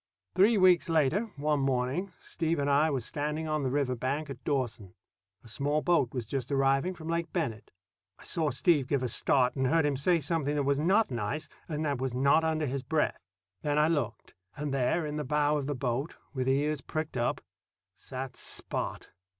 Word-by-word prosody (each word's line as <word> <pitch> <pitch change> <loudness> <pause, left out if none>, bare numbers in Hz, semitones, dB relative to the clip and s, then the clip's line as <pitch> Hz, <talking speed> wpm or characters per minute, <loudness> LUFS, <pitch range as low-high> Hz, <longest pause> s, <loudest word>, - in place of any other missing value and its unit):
Three 210 +4 +5
weeks 185 -2 +5
later, 165 - +2
one 150 0 0
morning, 135 +8 0
Steve 165 0 -1
and 140 - 0
I 150 +3 +4
were 135 -4 -1
standing 150 +5 -2
on 155 -1 0
the 135 - 0
river 135 -1 0
bank 140 +5 -2
at 130 -1 -9
Dawson. 120 -9 -2 0.5
A - - -14
small 145 +7 -1
boat 170 -8 +2
was 125 -3 -3
just 130 +3 -3
arriving 135 +6 +2
from 160 -2 -9
Lake 170 0 -1
Bennett. 120 - -3 0.5
I - - -16
saw 160 -3 0
Steve 140 +1 +2
give 140 -2 0
a - - +1
start, 125 +2 +2
and 130 -1 +1
heard 160 +2 +3
him 145 -1 +1
say 170 +6 +2
something 150 -1 -1
that 145 - +1
was 140 +1 +1
not 190 +4 +3
nice 120 +6 -3 0.2
and 155 0 -2
that 140 -4 -1
was 130 -2 -2
not 140 +5 +4
under 160 -1 0
his 135 0 -2
breath. 155 +3 0 0.4
Then 145 0 0
I 150 +1 +4
looked; 140 -9 -2 0.2
and 145 -1 -3
there, 140 +5 +1
in 150 0 -3
the 150 - -2
bow 150 +2 +2
of 140 - -4
the 145 - -1
boat, 125 +4 -2 0.2
with 130 -1 -1
ears 145 +2 +1
pricked 155 +2 -4
up, 120 -1 0 0.5
sat 130 0 -7
Spot. - - -5
145 Hz, 200 wpm, -30 LUFS, 130-155 Hz, 0.5 s, Three